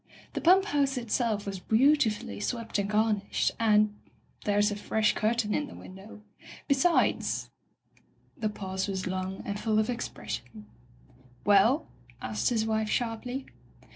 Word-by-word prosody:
The - - -3
pump 375 +3 +6
house 280 -7 +1
itself 230 -3 -1
was 195 -2 -4
beautifully 220 - +2
swept 230 - -2
and 200 0 -1
garnished, 210 -1 +1
and 215 -2 +4 0.3
— - - -26
there's 205 0 +3
a - - -2
fresh 215 +1 +1
curtain 220 -1 0
in 295 - -1
the - - -11
window. 195 +3 -12 0.4
Be - - +5
sides 330 +6 +1 0.8
The 225 -7 -1
pause 190 -1 -4
was 190 -2 -3
long 185 +1 -3
and 205 0 -3
full 215 -1 +1
of 215 +3 +2
expression. 110 - -6 0.4
— 125 -1 -27
^^*Well?" 215 +9 +5 0.3
asked 110 -2 -1
his 225 -2 +1
wife 220 -1 0
sharply. 245 +3 -2
215 Hz, 145 wpm, -29 LUFS, 195-235 Hz, 0.8 s, pump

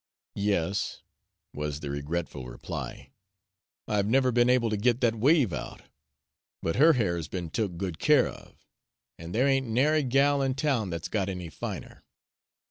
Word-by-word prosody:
"Yes," 100 -1 -1 0.5
was 75 0 -4
the 70 -2 -4
regretful 70 -2 -4
reply, - - -7 0.8
"I've 105 -1 +1
never 130 +2 +3
be'n 120 +1 +3
able 120 -3 +3
to - - +1
git 120 +3 +2
that 120 -2 +3
wave 125 - +3
out. - - -6 0.8
But 80 - -1
her 160 +5 +7
hair's 85 - -1
be'n 85 -3 -5
took 100 -5 -2
good 90 -3 -4
care 150 -4 +4
of, - - -13 0.5
an' 85 +1 -8
there 125 +8 +2
ain't 135 -2 +2
nary 145 +7 +3
gal 140 +2 +3
in 135 -1 0
town 130 -8 0
that's 85 -1 -4
got 100 -3 -1
any 90 -3 -5
finer." - - -7
110 Hz, 155 wpm, -28 LUFS, 85-130 Hz, 0.8 s, her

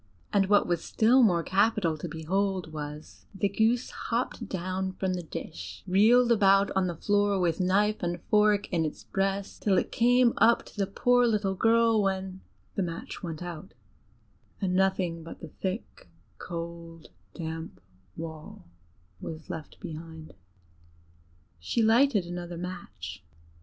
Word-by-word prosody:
And 195 -2 +3
what 205 0 +4
was 175 -2 -1
still 240 +4 +4
more 175 -8 +4
capital 195 -3 +2
to 175 - -4
behold 180 +2 -2
was, 150 0 -8
the 200 - +1
goose 220 +5 +1
hopped 230 -2 -3
down 185 +1 -3
from 185 0 -2
the 180 - -3
dish, 160 0 -8
reeled 225 +6 +5
about 195 -2 +4
on 190 -1 +1
the 175 - -3
floor 205 +2 +1
with 170 -1 +1
knife 200 +3 +2
and 175 -1 -2
fork 210 -1 +3
in 165 -2 +2
its 155 - -4
breast, 195 0 -2
till 195 -3 +2
it - - 0
came 245 0 +4
up 235 +1 +4
to - - -15
the 200 -2 0
poor 245 +5 +3
little 210 -4 +1
girl; 225 +2 +3
when 190 -1 -2 0.3
the - - -1
match 170 -2 -5
went 165 -2 -5
out 175 +1 -8 0.8
and 190 -3 -1
nothing 185 -3 +1
but 165 - -10
the 165 - -9
thick, 195 - -6 0.3
cold, 170 -1 -7 0.3
damp 160 0 -6 0.4
wall 160 -1 -8 0.5
was 160 - -7
left 155 -2 -8
behind. 160 0 -9 1.3
She 155 - 0
lighted 225 -2 +4
another 175 0 -6
match. 175 - -7
190 Hz, 145 wpm, -28 LUFS, 170-210 Hz, 1.3 s, reeled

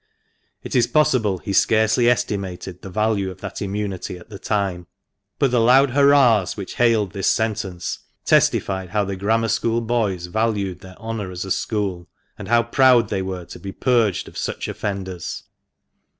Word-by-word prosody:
It - - -5
is 120 -2 +4
possible 130 -11 +2
he 100 - -5
scarcely 110 +3 +3
estimated 95 -6 -2
the 95 - -8
value 105 0 0
of 95 0 -10
that - - -6
immunity 100 -2 -4
at 90 - -15
the 100 -2 -9
time. 95 -5 -2 0.5
But 135 -3 +2
the 125 - +3
loud 130 +3 +5
hurrahs 135 -8 +4
which 95 - -7
hailed 115 -5 +3
this 100 -1 -2
sentence 100 -6 -1 0.3
testified 95 -2 +2
how 105 +1 0
the 100 0 -4
Grammar 110 +4 +1
School 115 +3 +1
boys 110 -7 -1
valued 100 -2 -1
their 95 0 -13
honour 110 -4 -5
as 90 +1 -5
a 95 - -6
school, 95 -6 -2 0.3
and - - -9
how 120 +1 +4
proud 120 -2 +4
they 100 -2 -1
were 95 -2 -5
to - - -11
be 100 - -6
purged 115 -5 +1
of - - -8
such - - -3
offenders. 95 -4 -5
105 Hz, 165 wpm, -21 LUFS, 95-115 Hz, 0.5 s, loud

